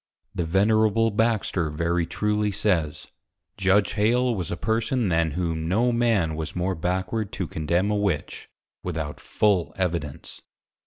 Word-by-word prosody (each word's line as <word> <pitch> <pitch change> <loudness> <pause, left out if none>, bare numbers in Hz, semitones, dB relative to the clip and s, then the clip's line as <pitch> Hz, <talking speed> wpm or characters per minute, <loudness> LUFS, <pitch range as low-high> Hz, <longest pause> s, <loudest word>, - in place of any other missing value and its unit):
The 85 - -2
Venerable 110 +5 +3
Baxter 105 -6 +1
very 85 +2 0
truly 105 +3 0
says, 90 -7 -1 0.5
_Judge 95 +1 +3
+Hale+ 120 +4 +2
was 90 -6 -3
a 85 - -3
Person, 115 +1 0
than 80 -3 +1
whom, 80 -3 -1
no 115 +8 +2
Man 115 -9 +2
was 80 0 -5
more 90 +2 0
Backward 95 +5 -2
to 95 - -2
Condemn 85 +6 0
a - - +1
Witch, 100 -7 -2 0.3
without 80 -4 -4
full 100 -5 +1
Evidence. 85 -6 -3
95 Hz, 140 wpm, -25 LUFS, 85-110 Hz, 0.5 s, Venerable